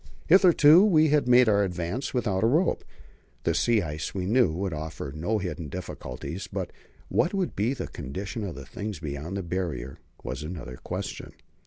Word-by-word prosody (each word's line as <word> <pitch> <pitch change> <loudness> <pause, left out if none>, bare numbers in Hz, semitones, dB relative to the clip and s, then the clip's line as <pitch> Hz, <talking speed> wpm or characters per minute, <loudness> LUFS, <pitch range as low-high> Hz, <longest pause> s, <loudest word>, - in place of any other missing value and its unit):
Hitherto 175 -2 +7
we 160 -7 +5
had 145 -3 +2
made 125 0 +6
our 100 -1 +4
advance 90 +7 -3
without 105 -7 0
a - - +5
rope. 160 +9 +2 0.6
The 85 - +1
sea 110 +5 +2
ice, 75 +2 -5
we 95 -2 -2
knew, 115 -1 +3
would 90 +2 -3
offer 75 -3 -5
no 90 +8 0
hidden 85 -5 -4
difficulties; 70 -7 -6
but - - -3 0.4
what 175 +4 +1
would 185 -3 -1
be 115 +7 0
the - - -4
condition 95 - -5
of 95 -4 -5
things 105 +3 -5
beyond 75 +4 -5
the 95 - -3
Barrier 85 -7 -4 0.2
was 65 +3 -4
another 75 -6 -7
question. - - -6
95 Hz, 170 wpm, -27 LUFS, 80-125 Hz, 0.6 s, Hitherto